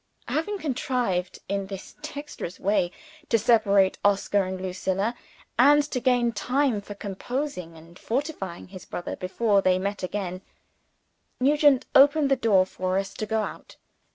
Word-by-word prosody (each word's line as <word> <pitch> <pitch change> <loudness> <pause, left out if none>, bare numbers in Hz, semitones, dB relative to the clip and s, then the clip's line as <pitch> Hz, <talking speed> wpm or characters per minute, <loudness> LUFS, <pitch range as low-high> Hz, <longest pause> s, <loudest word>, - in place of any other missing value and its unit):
Having 365 +7 -1
contrived 250 - -1
in 195 0 -2
this 195 -1 -8
dexterous 290 - -7
way 190 -3 +1 0.4
to 230 - +4
separate 200 -4 +3
Oscar 200 0 +2
and 185 0 -4
Lucilla, 190 +3 -1 0.5
and 290 +3 +7
to 255 - 0
gain 245 -2 +2
time 250 0 0
for 205 0 -9
composing 200 - -4
and 165 +2 -15
fortifying 230 - -4
his 185 -1 -10
brother 175 - -5
before 200 +2 +1
they 185 -1 +3
met 200 +2 -3
again, 185 -1 -4 1.0
Nugent 290 0 +4
opened 285 +1 +5
the - - +6
door 210 -7 +3
for 185 0 -2
us 195 0 -2
to 215 - -4
go 220 0 0
out. - - -8
205 Hz, 145 wpm, -26 LUFS, 190-260 Hz, 1.0 s, and